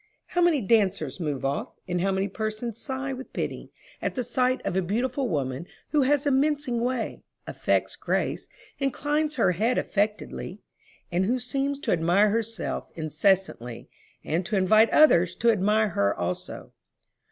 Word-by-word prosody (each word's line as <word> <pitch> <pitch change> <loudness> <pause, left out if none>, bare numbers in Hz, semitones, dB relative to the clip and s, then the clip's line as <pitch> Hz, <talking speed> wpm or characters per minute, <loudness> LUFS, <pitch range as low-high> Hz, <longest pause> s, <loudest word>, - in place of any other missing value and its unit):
How 355 - 0
many 340 -6 +4
dancers 190 - +1
move 145 -6 -2
off, 140 +1 -2
and 180 -1 -1
how 195 +1 +1
many 190 +1 0
persons 215 +3 -4
sigh 270 0 -3
with 260 0 -8
pity, - - -4 0.3
at - - -2
the 250 - -1
sight 250 +2 +1
of 180 - -1
a 190 - +3
beautiful 245 +7 -1
woman 140 0 -2 0.2
who 300 - +3
has 285 +1 +2
a 285 - +3
mincing 280 -3 +1
way, 245 -1 -2 0.2
affects - - 0
grace, - - -2 0.3
inclines 295 +3 0
her 225 -7 +3
head 220 +8 +1
affectedly, 210 +1 -2 0.5
and 180 +2 +1
who 245 +6 +1
seems 275 +3 -2
to - - -1
admire 180 +5 +3
herself 225 -3 -3
incessantly, 155 - 0 0.3
and 165 +4 -1
to 215 - -1
invite 215 +4 +5
others 180 - +5
to 235 0 +3
admire 210 +1 +2
her 100 - +1
also. 90 +1 -4
215 Hz, 155 wpm, -26 LUFS, 180-260 Hz, 0.5 s, invite